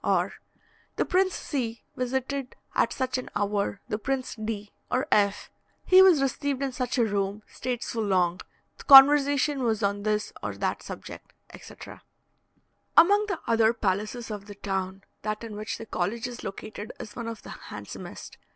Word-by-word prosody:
Or, - - +1 0.6
"The - - 0
Prince 375 0 +2
C. 235 -5 -3
visited 265 +1 -2 0.2
at - - +2
such 255 -1 -1
an 255 - -7
hour 200 -1 -1
the 210 - -2
Prince 260 +3 -2
D. 215 -2 -5 0.2
or 255 +1 0
F.; 205 -1 +2 0.3
he 370 0 +8
was 355 -7 +6
received 275 0 -1
in 270 - -1
such 250 0 -2
a 235 - +4
room; 200 0 -2
stayed 250 -1 -4
so 230 - -4
long; 185 -4 +1 0.4
the - - -10
conversation 285 0 +7
was 225 -4 0
on 200 0 0
this 210 0 -1
or - - -4
that - - -1
subject," - - -9 0.2
etc. - - -11 1.0
Among 405 +5 +6
the 390 -6 -3
other 225 0 +3
palaces 215 +3 -2
of 205 -1 -6
the 205 - -9
town, 195 -1 -3 0.2
that 215 +1 -3
in 220 -2 -7
which 215 +2 -4
the 225 - -8
college 220 +4 -2
is 245 -1 -8
located 210 +2 -7
is 210 - -8
one 235 -1 -5
of 230 -1 -6
the - - -9
handsomest. - - -9
230 Hz, 170 wpm, -27 LUFS, 205-265 Hz, 1.0 s, he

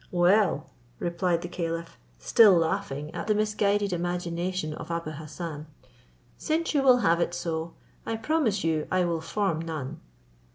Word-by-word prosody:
"Well," 175 -3 +3 0.3
replied 170 0 0
the - - -3
caliph, 165 -1 -4 0.2
still 200 - +6
laughing 160 -4 -2
at 170 +2 -5
the 215 - +3
misguided 205 -2 +1
imagination 175 -1 -2
of - - -8
Abou 170 -2 -3
Hassan, 155 0 -7 0.7
"since 325 +2 0
you 290 - +3
will 255 -2 +6
have 170 +1 +4
it 175 0 0
so, 165 -1 -3 0.3
I 225 - -2
promise 225 -4 0
you 160 -2 0
I 185 -1 +2
will 170 -2 -1
form 175 -1 -1
none." 155 -2 -5
175 Hz, 150 wpm, -27 LUFS, 165-200 Hz, 0.7 s, still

